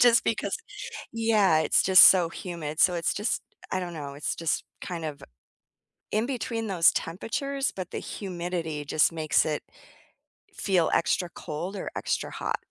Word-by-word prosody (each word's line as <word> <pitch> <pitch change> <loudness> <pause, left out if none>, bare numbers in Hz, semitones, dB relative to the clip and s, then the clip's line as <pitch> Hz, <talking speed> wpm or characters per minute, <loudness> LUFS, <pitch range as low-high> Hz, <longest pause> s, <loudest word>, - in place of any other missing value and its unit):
just 240 -1 +6
because 225 - -1 0.6
yeah, 220 -7 +3
it's 155 - +3
just 185 0 +9
so 175 -3 +2
humid, 165 -4 -5
so 180 - +5
it's 170 -1 0
just, 210 +3 -1 0.3
I - - 0
I - - -2
don't 175 -1 -5
know, 140 -3 -6
it's 145 - -3
just 165 -1 -1 0.2
kind 170 -3 -5
of 150 -2 -5 0.9
in 215 +2 +2
between 230 -4 -3
those 175 -4 +5
temperatures, 270 +10 -2
but 185 -2 -6
the - - -4
humidity 175 -5 -4
just 150 +3 +3
makes 155 -2 +2
it 150 -1 -2 0.9
feel 185 -5 +1
extra 175 +1 +1
cold 170 +6 -5
or - - -4
extra - - -2
hot. - - -2
180 Hz, 160 wpm, -27 LUFS, 160-210 Hz, 0.9 s, just